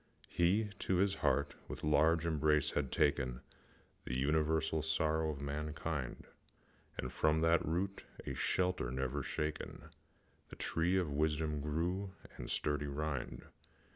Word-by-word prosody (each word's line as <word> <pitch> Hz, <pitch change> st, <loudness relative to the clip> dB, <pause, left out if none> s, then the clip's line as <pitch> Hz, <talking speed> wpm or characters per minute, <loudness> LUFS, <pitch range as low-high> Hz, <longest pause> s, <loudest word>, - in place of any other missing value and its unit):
He 100 Hz, +5 st, +2 dB
to 95 Hz, -, +1 dB
his 95 Hz, +2 st, +3 dB
heart 70 Hz, 0 st, +2 dB
with -, -, -7 dB
large 80 Hz, +2 st, +4 dB
embrace 75 Hz, -2 st, +3 dB
had 70 Hz, -3 st, -1 dB
taken 65 Hz, -3 st, +1 dB, 0.6 s
The 65 Hz, -, -2 dB
universal 80 Hz, +3 st, +2 dB
sorrow 80 Hz, 0 st, +1 dB
of 75 Hz, -3 st, -4 dB
mankind, 75 Hz, -1 st, -3 dB, 0.7 s
And, 60 Hz, 0 st, -4 dB
from 80 Hz, +4 st, +3 dB
that 80 Hz, 0 st, +4 dB
root, 95 Hz, +5 st, -1 dB, 0.2 s
a -, -, -3 dB
shelter 90 Hz, -8 st, +1 dB
never 65 Hz, +3 st, -1 dB
shaken, 75 Hz, +3 st, -4 dB, 0.6 s
The -, -, -9 dB
tree 85 Hz, +3 st, +1 dB
of 90 Hz, -5 st, 0 dB
wisdom 75 Hz, 0 st, 0 dB
grew 90 Hz, +6 st, -1 dB, 0.3 s
with -, -, -5 dB
sturdy 75 Hz, -1 st, 0 dB
rind. 70 Hz, -2 st, -3 dB
75 Hz, 130 wpm, -35 LUFS, 70-80 Hz, 0.7 s, large